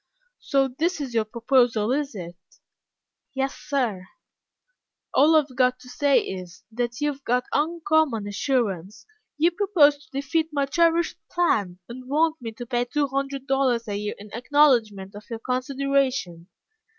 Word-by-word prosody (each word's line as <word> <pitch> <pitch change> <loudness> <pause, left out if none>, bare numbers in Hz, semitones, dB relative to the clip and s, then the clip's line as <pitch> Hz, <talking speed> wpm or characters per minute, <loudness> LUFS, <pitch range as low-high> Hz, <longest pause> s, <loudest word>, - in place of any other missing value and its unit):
"So 275 -2 +1
this 315 +7 -2
is 270 -4 -5
your 225 -2 +1
proposal, 235 -1 +2
is 280 -2 -1
it?" 175 -2 -7 1.0
"Yes, 270 0 -1
sir." 230 -10 -2 1.1
"All 305 +4 +5
I 310 - +7
have 275 -3 -13
got 250 0 +2
to 250 0 -14
say 285 +2 +3
is, 180 -2 -8
that 240 +2 -3
you 295 0 +2
have 275 -1 -12
got 250 0 +1
uncommon 310 -7 +1
assurance. 205 - -2 0.3
You 330 +4 +3
propose 325 -7 +3
to - - -25
defeat 280 +4 -1
my 285 -2 0
cherished 335 +3 +1
plan, 210 - +1
and 255 +2 -10
want 315 +1 +1
me 230 -2 -5
to 240 +2 -8
pay 240 0 -1
two 285 +3 -1
hundred 275 0 -3
dollars 265 -4 +1
a 205 - -3
year 210 +1 -3
in 205 0 -13
acknowledgment 235 -7 +2
of 205 +1 -12
your 230 - -4
consideration." 255 -7 -1
260 Hz, 155 wpm, -24 LUFS, 225-290 Hz, 1.1 s, I